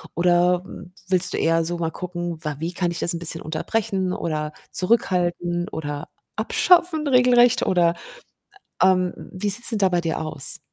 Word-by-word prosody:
Oder, 175 +1 +2
hm, 180 -1 -12
willst 180 -1 +8
du - - -2
eher 165 0 +1
so 175 +1 -3
mal 165 -1 -3
gucken, 175 -2 -6
wa 150 -1 -4
wie 170 +2 -4
kann 175 0 -2
ich 170 - -6
das 175 - 0
'n 170 - -5
bisschen 165 -1 +1
unterbrechen 185 +3 -3
oder 155 -3 -4 0.2
zurückhalten 175 -4 0
oder 145 0 -6 0.3
abschaffen 340 -4 +2
regelrecht 250 -2 +4
oder, 170 -2 +2 0.9
ähm 185 -1 +2 0.2
wie 200 +2 -3
sieht's 230 +5 +2
denn 225 - -2
da 195 -2 +3
bei 175 -1 0
dir 165 -1 -3
aus? 150 -3 -3
175 Hz, 170 wpm, -22 LUFS, 165-190 Hz, 0.9 s, willst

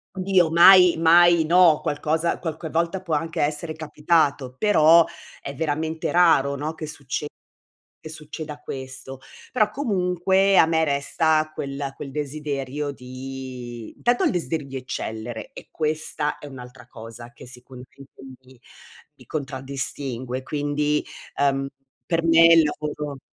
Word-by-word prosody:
Dio 185 -3 +2
mai, 180 +2 +7
mai 170 +1 +5
no, 170 -2 +5
qualcosa 155 +3 -1
qualche 160 -1 -5
volta 170 +3 -1
può 170 - -3
anche 165 +2 -2
essere 150 +2 -1
capitato, 150 -4 0
però 165 -4 +5 0.4
è 140 - -6
veramente 160 +2 -2
raro, 160 -6 +4
no, 150 +3 -4
che 160 -1 -7
succe 145 0 -5 0.7
che 155 - -9
succeda 155 -1 -8
questo. 130 -1 -8 0.3
Però 215 -5 +2
comunque 190 - +1
a - - +7
me 160 0 +1
resta 155 +2 +1
quel 140 0 -5
quel 140 - -8
desiderio 145 -1 -4
di 130 -2 -9
tanto 240 0 +2
il - - +2
desiderio 160 -5 -3
di 135 - -9
eccellere, 110 -3 -6
e - - -12
questa 155 -1 -2
è 145 - -11
un'altra 125 -2 -12
cosa 115 +1 -11
che 120 - -14
sicuramente 125 +2 -13 0.3
mi 130 -1 -19 0.6
mi - - -18
contraddistingue. 130 -2 -5
Quindi, 150 +1 -1 0.3
ehm, 135 -1 +1 0.4
per 165 -1 -1
me 165 0 +6
il 165 -1 +6
lavoro 150 -1 -4
150 Hz, 130 wpm, -23 LUFS, 135-165 Hz, 0.7 s, mai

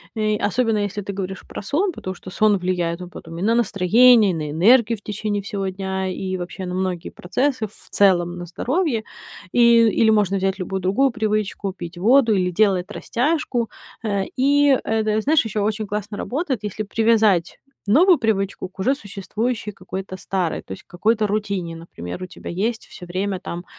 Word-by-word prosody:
э, 215 -1 +1
особенно 225 +2 +1
если 205 0 -2
ты 200 0 -5
говоришь 190 0 -5
про - - -7
сон, 330 - 0
потому 185 - -6
что 185 +1 -11
сон 210 +2 +3
влияет 175 -2 -1
потом 165 -1 -9
и - - -5
на 225 +4 +2
настроение, 225 +1 +5
и - - -3
на 155 -2 -4
энергию 225 - +4
в - - -32
течение 210 0 -3
всего 200 -1 -3
дня, 190 0 -3
и 185 0 -3
вообще 180 +1 -6
на 180 - -4
многие 185 -2 -2
процессы, 255 +6 -1
в 210 - -15
целом 175 -3 +3
на 175 - -6
здоровье. 250 - -1 0.5
И 240 - +4 0.3
или 220 +1 +3
можно 200 -3 +2
взять 195 +1 -1
любую 190 +1 -3
другую 195 +10 +2
привычку: 215 -4 -2
пить 175 -1 -8
воду 230 +4 +4
или 180 -1 +1
делать 190 0 +2
растяжку. 245 -2 -1 0.3
Э, 200 -3 0
и 280 +1 +4
это 220 -1 0
знаешь, 300 +6 +3
ещё 210 -1 -2
очень 215 0 -1
классно 210 0 -4
работает, 270 - -2
если 210 +1 -3
привязать 215 -4 +2 0.3
новую 330 - +5
привычку 200 -5 -1
к 190 - -27
уже 260 +8 +2
существующей 210 +1 -4
какой-то 190 0 -7
старой, 185 -2 -2
то - - -15
есть 95 - -7
какой-то 215 +4 +1
рутине. 200 -5 -2
Например, 165 - -8
у - - -5
тебя - - -9
есть 220 +6 -2
всё 180 - -11
время 185 +2 -3
там, 175 -1 -6
205 Hz, 180 wpm, -22 LUFS, 185-225 Hz, 0.5 s, настроение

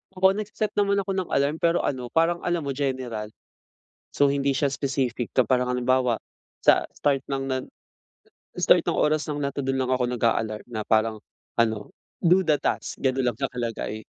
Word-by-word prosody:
Ako, 190 +1 +5
nagseset 210 +1 -3
naman 200 0 +3
ako 195 - -4
ng 185 - -3
alarm 140 +3 +1
pero 170 0 +2
ano 125 -3 -2
parang 165 +6 +2
alam 175 -2 0
mo 140 - -2
general. 130 -6 -3 0.9
So, 140 -1 +4
hindi 140 -1 +1
siya 140 -2 +1
specific 130 -3 -1
na 130 - +5
parang 125 +2 +1
halimbawa 125 -1 +2 0.5
sa - - +5
start 140 -2 +1
ng, 135 -1 -2
na 130 -1 -1 1.0
start - - +4
ng - - +1
oras 150 0 +1
lang 145 -1 -3
na 140 - -1
to' 140 - -6
dun 135 0 0
lang 130 -1 0
ako 125 -1 +1
nag-aalarm 115 -3 0
na 110 -2 -4
parang 110 0 +2 0.4
ano, 110 -3 +1 0.3
"Do 180 +2 +6
the 150 - +5
task," - - -2
ganun 130 -1 +1
lang 120 - -1
nakalagay. 120 -5 -3
135 Hz, 180 wpm, -25 LUFS, 120-145 Hz, 1.0 s, Do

